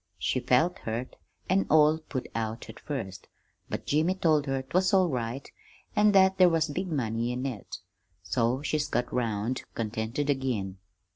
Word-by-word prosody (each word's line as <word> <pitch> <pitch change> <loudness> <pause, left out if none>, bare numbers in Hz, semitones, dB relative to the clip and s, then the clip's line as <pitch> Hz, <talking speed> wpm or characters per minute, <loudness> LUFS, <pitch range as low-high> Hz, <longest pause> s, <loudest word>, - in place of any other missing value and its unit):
She - - 0
felt 130 +8 +2
hurt, 115 +3 -4 0.3
an' 190 +2 +2
all 155 0 +5
put 140 -5 -5
out 110 0 -3
at - - -15
first: 95 -11 -6 0.4
but - - -4
Jimmy 160 +5 +2
told 155 -6 +2
her 135 -1 -1
'twas 185 +8 +2
all 185 -2 +4
right, 125 0 -3 0.5
an' 210 0 +5
that 190 0 +5
there 180 -1 +8
was 165 -1 +1
big 180 +4 -3
money 120 -4 -1
in 125 +2 -3
it; 125 -7 -5 0.5
so 125 +4 0
she 155 0 0
got 120 +1 -1
'round 115 0 -1
contented 115 +5 -2
again. 120 -9 -1
135 Hz, 160 wpm, -28 LUFS, 115-160 Hz, 0.5 s, there